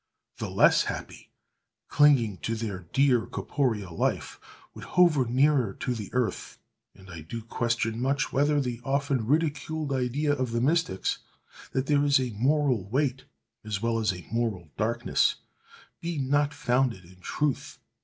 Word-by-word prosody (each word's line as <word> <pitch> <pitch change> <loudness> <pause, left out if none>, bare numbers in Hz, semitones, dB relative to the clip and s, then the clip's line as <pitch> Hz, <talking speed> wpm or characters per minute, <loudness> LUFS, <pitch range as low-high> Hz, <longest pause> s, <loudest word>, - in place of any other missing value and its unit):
The - - -3
less - - +4
happy, - - -6 0.6
clinging 130 -9 +4
to 115 - -3
their 100 -6 -5
dear 135 -4 +3
corporeal 110 - -2
life, - - -1 0.3
would - - -10
hover 170 -7 +3
nearer 130 -3 +2
to 125 - -2
the 110 -4 -6
earth; 125 -2 -2 0.4
and 95 -1 -16
I 85 -2 -8
do 110 +9 -7
question 115 0 -1
much 140 +3 0
whether 145 +2 +3
the 125 -3 -3
often 135 -3 0
ridiculed 155 0 0
idea 135 +3 0
of 130 -4 -2
the 115 - +1
mystics, 145 - 0 0.5
that 130 0 0
there 145 0 +3
is 140 -2 +4
a 125 -2 -2
moral 130 -3 +1
weight, 135 +1 0 0.4
as 105 -2 -3
well 115 -1 +1
as 105 -3 +1
a 90 -1 -9
moral 110 -9 -2
darkness, 115 +3 +1 0.6
be 170 -1 -4
not 145 +2 +1
founded 125 -8 0
in 90 +2 -17
truth. 145 +8 -2
125 Hz, 150 wpm, -27 LUFS, 110-145 Hz, 0.6 s, less